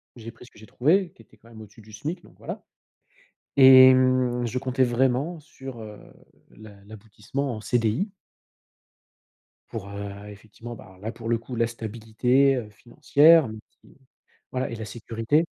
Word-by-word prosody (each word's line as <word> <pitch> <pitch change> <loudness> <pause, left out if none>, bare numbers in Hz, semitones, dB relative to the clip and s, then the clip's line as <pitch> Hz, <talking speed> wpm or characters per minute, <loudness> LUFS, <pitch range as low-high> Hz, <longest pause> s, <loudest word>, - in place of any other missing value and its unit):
j'ai 115 -2 -10
pris 120 +1 -16
ce - - -19
que - - -19
j'ai 110 - -14
trouvé 170 - +1
qui 115 - -18
était - - -25
quand 115 - -21
même 110 -1 -12
au-dessus 105 +1 -15
du 110 0 -17
SMIC, 155 - -6
donc - - -19
voilà, - - -8 1.0
et 130 -1 +9
mmh, 130 -1 +2
je 125 +2 -3
comptais 130 +1 -1
vraiment 130 +7 0
sur, 135 -4 -11
heu, 105 -1 -10 0.6
l'a 110 -1 -13
l'aboutissement 110 +5 -6
en 110 - -7
CDI. 120 - -1 1.6
Pour, 105 -3 -7
heu, 100 0 -8
effectivement 110 +3 -11
bah 95 -4 -15
là 110 +3 -5
pour 115 - -8
le 115 0 +1
coup 115 +2 -9
la 115 0 +1
stabilité, 120 +4 0
heu, 115 -4 -6
financière 145 +7 +4
et 110 0 -8 0.2
puis, - - -21 0.5
voilà 130 0 -3
et 115 - -5
la 110 - -6
sécurité 115 +7 -1
120 Hz, 170 wpm, -25 LUFS, 110-130 Hz, 1.6 s, et